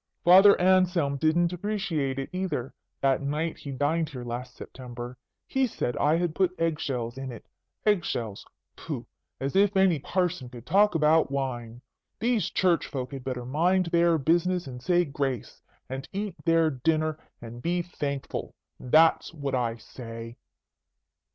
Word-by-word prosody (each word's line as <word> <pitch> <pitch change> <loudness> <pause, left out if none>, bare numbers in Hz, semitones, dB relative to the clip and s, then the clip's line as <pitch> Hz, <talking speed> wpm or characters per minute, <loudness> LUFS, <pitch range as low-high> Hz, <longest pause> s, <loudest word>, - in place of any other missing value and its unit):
Father 190 +3 +8
Anselm 180 -6 +3
didn't 170 +4 +2
appreciate 180 -8 -2
it, 135 - -4
either, 185 -9 -3 0.3
that 135 0 +2
night 150 +4 -2
he 145 - -8
dined 145 +4 0
here 130 -5 -7
last 125 +1 -6
September. 125 -1 -8 0.3
He 265 -1 +1
said 125 - -3
I 150 +2 +3
had 175 -2 -1
put 180 +1 +1
egg 165 -2 0
shells 125 -2 -3
in 135 -1 -5
it. 115 - -10 0.4
Egg 205 -5 +3
shells! 110 -9 -4 0.3
Pooh! - - -6 0.3
As 135 +6 -3
if 200 0 +4
any 190 -5 +4
parson 175 -4 -1
could 120 -1 -11
talk 200 +4 +4
about 155 0 +4
wine. 125 -3 -4 0.4
These 235 -2 +1
Church 180 -3 +2
folk 130 -3 -5
had 135 -2 -6
better 125 -2 -4
mind 170 +7 +2
their 170 -1 +4
business, 175 +4 +1
and 125 -2 -8
say 175 +6 +2
grace, 135 -4 -3 0.3
and 135 +2 -6
eat 200 -1 -3
their 165 -1 +4
dinner, 155 +3 0 0.2
and 120 +1 -9
be 175 +3 0
thankful. 140 -5 -4 0.2
That's 160 +6 +4
what 140 -3 -3
I 120 -3 0
say. 115 0 -9
155 Hz, 155 wpm, -27 LUFS, 130-175 Hz, 0.4 s, Father